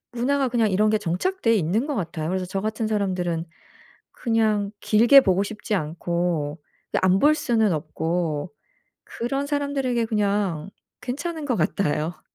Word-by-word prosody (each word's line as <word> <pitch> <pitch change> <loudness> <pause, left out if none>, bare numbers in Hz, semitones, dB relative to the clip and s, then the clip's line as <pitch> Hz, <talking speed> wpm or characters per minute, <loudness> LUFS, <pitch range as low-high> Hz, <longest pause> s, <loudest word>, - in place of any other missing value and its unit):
문화가 265 +3 +1
그냥 230 -3 +1
이런 210 +3 +3
게 215 - +2
정착돼 230 - 0
있는 200 - 0
것 300 - -2
같아요. 160 -4 -3
그래서 185 0 -2
저 195 +2 -3
같은 215 +2 -2
사람들은 180 -6 -1 0.7
그냥 215 -4 0
길게 235 +6 +6
보고 190 -2 +2
싶지 210 0 -4
않고 165 -2 -2 0.3
근데 - - +1
안 185 +1 +4
볼 300 +1 +5
수는 225 - +1
없고 160 0 -2 0.5
그런 275 +4 -3
사람들에게 280 -5 -1
그냥 200 -6 0 0.3
괜찮은 300 +5 -4
것 250 - +1
같아요. 165 -2 -1
210 Hz, 295 characters per minute, -24 LUFS, 175-240 Hz, 0.7 s, 길게